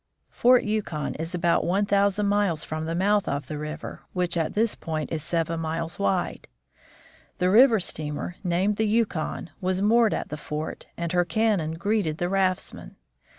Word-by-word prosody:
Fort 250 +1 +4
Yukon 205 -9 -2
is 165 +2 -3
about 170 -1 +2
one 195 +4 +1
thousand 200 0 +2
miles 200 -6 +1
from 155 0 -4
the 165 - -2
mouth 205 +3 +2
of 140 0 -2
the 150 +2 -5
river, 150 +1 -6
which 180 -2 0
at 165 -2 -1
this 225 +1 +2
point 155 -2 -4
is 160 -2 -2
seven 165 0 -1
miles 165 +1 -3
wide. 100 -1 -1 0.9
The 180 0 +2
river 230 +1 +7
steamer, 155 -1 -3
named 185 +3 +1
the 220 - +1
Yukon, 205 -6 -1
was 185 +1 0
moored 225 +1 +4
at - - -4
the 150 - -5
fort, 150 +1 -5
and 170 -1 -3
her 180 -1 +3
cannon 200 -5 +1
greeted 180 -3 0
the 175 +1 -1
raftsmen. 190 -1 -1
180 Hz, 170 wpm, -25 LUFS, 160-205 Hz, 0.9 s, river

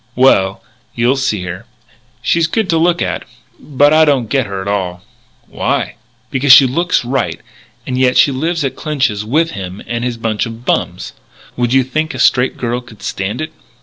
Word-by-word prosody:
"Well, 100 -7 +3 0.3
you'll 120 +3 +2
see 110 -8 -1
her. 90 0 -7 0.6
She's 170 -1 +2
good 210 +2 -1
to 165 - +2
look 170 +1 +2
at. - - -3 0.4
But 145 +1 +2
I 160 0 +6
don't 135 -7 +2
get 135 -5 +1
her 100 -1 -5
at 95 - -6
all." 90 -3 -2 0.4
"Why?" - - -2 0.4
"Because 135 0 +3
she 135 - +9
looks 170 +2 0
right 120 -10 -1 0.5
and 125 0 -2
yet 130 -1 +3
she 140 - +5
lives 160 +4 -1
at 135 - -3
Clinch's 135 -9 -1
with 155 +9 +1
him 95 0 -7
and 120 0 -3
his 120 -1 -2
bunch 115 0 -1
of 115 +1 -10
bums. - - -2 0.4
Would 120 -1 0
you 135 0 +4
think 155 +5 -2
a - - -5
straight 125 0 +3
girl 120 0 -2
could 115 -4 -16
stand 100 +7 -3
it?" 155 0 -5
125 Hz, 185 wpm, -15 LUFS, 110-145 Hz, 0.6 s, she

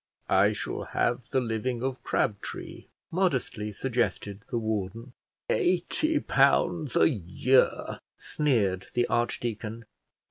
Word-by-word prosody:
"I 95 +2 +5
shall - - -4
have 120 0 -1
the 135 - +2
living 120 +1 -2
of 130 -1 -2
Crabtree," 100 -2 -3 0.2
modestly 135 - 0
suggested 110 -3 -2
the - - -1
warden. 110 +2 -3 0.3
"Eighty 240 - +1
pounds 140 - +2
a - - +6
year!" 125 - +1 0.2
sneered 105 -11 0
the 120 0 +3
archdeacon. 115 -1 -2
120 Hz, 105 wpm, -28 LUFS, 105-135 Hz, 0.3 s, a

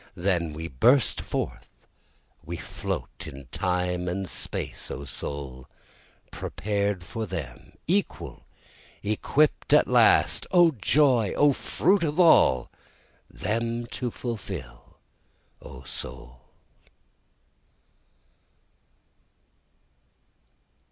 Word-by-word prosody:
Then 85 -3 0
we 80 +2 -5
burst 120 - +3
forth, - - -5 0.6
we 85 +2 -5
float, - - -5
In 70 0 -9
Time 90 0 -1
and 95 +2 -2
Space - - -4
O 70 - -6
soul, 70 -4 -6 0.6
prepared 100 -2 -2
for 110 +1 -4
them, 70 -8 -7
Equal, 195 +5 -2 0.6
equipt 125 +8 +1
at - - +2
last, - - +4
(O 175 -2 +6
joy! 125 -3 +3
O 145 -1 +4
fruit 185 +7 +1
of 155 +1 -1
all!) 65 - +5 0.6
them 115 +3 -2
to 125 - -2
fulfil 95 - -7 0.6
O - - -11
soul. 65 0 -9
100 Hz, 85 wpm, -26 LUFS, 75-125 Hz, 0.6 s, O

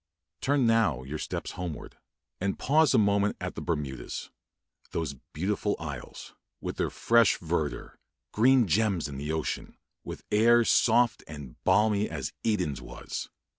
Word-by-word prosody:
Turn 140 -2 +2
now 110 - +2
your 75 +4 -5
steps - - -4
homeward, 85 -5 -6 0.4
and 95 +1 -1
pause 155 0 +3
a - - +6
moment 100 -1 +2
at - - -4
the - - -6
Bermudas, 75 -6 -4 0.6
those 80 -4 -2 0.2
beautiful 100 +5 -1
isles, 75 -6 -8 0.3
with - - -5
their - - 0
fresh 115 -3 +3
verdure 80 -3 -3 0.3
green 125 +2 +5
gems 95 -2 +1
in 70 -1 -7
the 75 +2 -3
ocean, 80 -1 -3 0.3
with - - -8
air 115 +2 +5
soft 120 +1 +3
and 75 -5 -10
balmy 105 -1 +3
as 75 -5 -4
Eden's 90 - 0
was! - - -6
100 Hz, 140 wpm, -28 LUFS, 75-115 Hz, 0.6 s, a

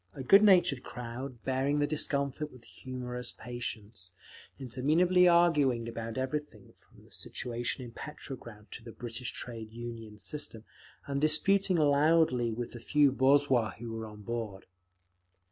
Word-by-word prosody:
A 135 - -6
good 195 +10 +7
natured 175 -9 +5
crowd, 125 0 -7
bearing 135 +2 0
the 145 - +2
discomfort 145 0 0
with 125 -2 -15
humorous 125 -1 -6
patience, 110 -5 -6 0.5
interminably 155 +8 +3
arguing 150 -9 +4
about 115 0 -5
everything 130 -5 -4
from - - -22
the - - -22
situation 120 +2 -4
in 120 - -10
Petrograd 120 -6 -9
to 115 - -8
the 115 -1 -10
British 120 +1 -5
Trade 115 -3 -6
Union 115 -2 -8
system, 115 -2 -5 0.4
and 140 0 -2
disputing 185 +5 +4
loudly 145 -4 +3
with 120 +1 -4
the 120 - -8
few 145 +3 +3
boorzhui 130 -3 +3
who 115 +1 -7
were 110 0 -5
on 105 -1 -12
board. 110 -4 -5
125 Hz, 140 wpm, -31 LUFS, 115-145 Hz, 0.5 s, good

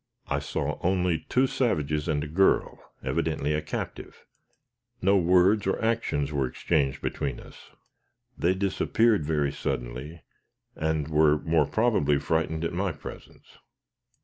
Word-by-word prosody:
I - - +1
saw - - -3
only 90 -3 0
two 130 +1 +3
savages, 75 - 0
and 75 -3 0
a - - -5
girl, 95 +6 +2 0.2
evidently 75 +1 -1
a 75 - 0
captive; 75 - -6 0.7
no 100 -1 +3
words 95 +3 +4
or 95 - 0
actions 110 -11 0
were 70 -3 +1
exchanged 70 0 -1
between - - -3
us. - - -14 0.7
They 90 +3 +1
disappeared 100 +1 +2
very 75 -3 +1
suddenly 65 +7 -5 0.5
and 80 -2 -1
were, 75 -1 +4
more 80 -2 +1
probably, 75 -7 +2
frightened 80 +2 -1
at 85 - -2
my 95 +2 0
presence. 70 - -12
80 Hz, 130 wpm, -27 LUFS, 75-95 Hz, 0.7 s, words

